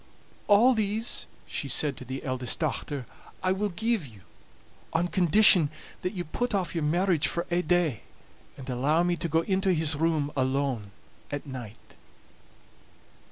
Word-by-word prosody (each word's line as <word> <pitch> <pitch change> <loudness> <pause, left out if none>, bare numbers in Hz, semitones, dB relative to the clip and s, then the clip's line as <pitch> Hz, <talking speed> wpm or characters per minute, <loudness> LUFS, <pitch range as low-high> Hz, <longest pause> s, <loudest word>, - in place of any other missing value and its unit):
"All 220 +5 +6
these," 220 +1 -1 0.2
she - - -4
said 145 -3 +1
to 130 - -9
the 130 +2 -6
eldest 130 -2 -1
dochter, 145 -4 -3 0.4
"I 185 - +2
will 205 +2 0
give 220 -2 -1
you, 105 -5 -16 0.7
on 170 +2 +1
condition 180 -3 +6 0.3
that 180 - -3
you 180 -3 -3
put 240 +8 -2
off 185 -3 -1
your 165 -3 -2
marriage 170 0 +2
for 170 - -3
ae 175 +1 +2
day, 175 - +1 0.6
and 135 - -10
allow 140 +6 +1
me 175 0 +1
to 170 - -3
go 160 +2 +2
into 190 +1 +1
his 160 -2 +2
room 155 -2 0
alone 130 -5 -1 0.4
at 145 0 -5
night." 125 -6 -10
165 Hz, 155 wpm, -27 LUFS, 140-190 Hz, 0.7 s, All